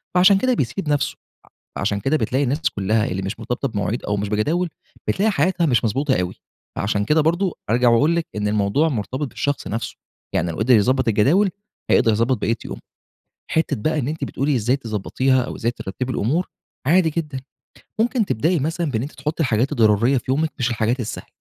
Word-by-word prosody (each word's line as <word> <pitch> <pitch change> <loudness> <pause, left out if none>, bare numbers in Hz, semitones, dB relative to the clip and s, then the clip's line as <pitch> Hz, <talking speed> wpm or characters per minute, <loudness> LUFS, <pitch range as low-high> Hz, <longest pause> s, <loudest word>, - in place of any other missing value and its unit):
فعَشان 185 +2 +6
كده 255 +5 +2
بيسِيب 150 - -2
نفْسه، 145 -2 0 0.6
ع - - -4
عشان 100 0 0
كده 135 +8 +1
بتلاقي 135 -1 0
الناس 140 +4 -1
كلّها 105 +2 +1
اللي 95 -4 -2
مش 95 +3 -4
مرتبطة 125 +3 -2
بمواعيد، 105 -1 -2
أو 105 - -1
مش 100 0 -2
بجداول، 155 - 0 0.4
بتلاقي 215 +3 +2
حياتها 175 +1 +1
مش 120 -7 +2
مضبوطة 130 +4 +1
أوي، 90 - -4 0.4
فعَشان 100 0 0
كده 155 +7 +3
برضه 170 +4 +1 0.2
أرجَع 120 +2 +4
وأقول 145 +8 +4
لِك 170 -1 -1
إن 105 0 -1
الموضوع 105 +9 +2
مرتبِط 130 - -3
بالشخص 145 0 -2
نفْسه، 115 +2 -4 0.4
يعني 85 +1 0
لو 80 - -7
قدِر 120 +4 +4
يضبّط 130 +4 +2
الجداول، 140 - +3 0.4
هيقدَر 115 - +4
يضبّط 115 +3 +1
بقيّة 115 +2 +1
يومُه. - - -7 0.7
حتّة 160 - +1
بقى 155 +8 -1
إن 130 - -1
أنتِ 155 -2 -3
بتقولي 140 +1 -1
إزّاي 120 +3 +1
تضبّطيها، 130 +2 0
أو - - -5
إزّاي 115 - 0
ترتّبي 120 +3 -5
الأمور، 155 - 0 0.4
عادي 170 +1 +4
جدًا، 150 -4 -3 0.6
ممكن 235 0 +2
تبدئي 165 - +1
مثلًا 165 +2 -1
بإن 110 -3 -1
أنتِ 140 +5 -5
تحطّي 150 +4 -2
الحاجات 125 0 +1
الضرورية 115 +3 +3
في 120 - -4
يومِك، 155 +4 +1
مش 120 -1 +1
الحاجات 115 +2 0
السهلة، 110 - -5
130 Hz, 190 wpm, -21 LUFS, 110-155 Hz, 0.7 s, فعَشان